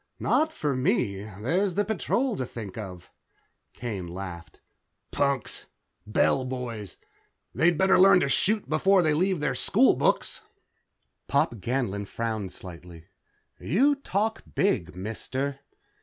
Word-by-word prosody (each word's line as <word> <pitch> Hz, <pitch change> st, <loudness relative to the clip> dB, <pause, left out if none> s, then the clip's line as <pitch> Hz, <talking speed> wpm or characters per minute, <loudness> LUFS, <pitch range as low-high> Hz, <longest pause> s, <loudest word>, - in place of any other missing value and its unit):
"Not 315 Hz, +1 st, +2 dB
for 150 Hz, -, -2 dB
me. 125 Hz, -, 0 dB
There's 160 Hz, -, -1 dB
the 205 Hz, +1 st, +1 dB
Patrol 235 Hz, +3 st, 0 dB
to -, -, -1 dB
think 110 Hz, -6 st, -7 dB
of." 95 Hz, -5 st, -8 dB, 0.6 s
Kane 105 Hz, -7 st, -5 dB
laughed. 85 Hz, -3 st, -8 dB, 0.5 s
"Punks. 140 Hz, -2 st, -1 dB, 0.4 s
Bell 120 Hz, +4 st, +2 dB
boys. 125 Hz, -6 st, -5 dB, 0.6 s
They'd 170 Hz, 0 st, +3 dB
better 190 Hz, +1 st, +4 dB
learn 190 Hz, 0 st, +7 dB
to -, -, +1 dB
shoot 210 Hz, +9 st, +2 dB
before 185 Hz, +4 st, +3 dB
they 155 Hz, -2 st, +3 dB
leave 180 Hz, +1 st, +1 dB
their 150 Hz, -3 st, 0 dB
school 210 Hz, -, +3 dB
books." -, -, 0 dB, 0.9 s
Pop 120 Hz, -, +1 dB
Ganlon 105 Hz, -3 st, -2 dB
frowned 110 Hz, -5 st, -3 dB
slightly. 85 Hz, -1 st, -11 dB, 0.5 s
"You 265 Hz, -, +3 dB
talk 220 Hz, -5 st, -2 dB
big, 90 Hz, -, +1 dB
mister." 130 Hz, +8 st, -4 dB
130 Hz, 125 wpm, -27 LUFS, -, 0.9 s, learn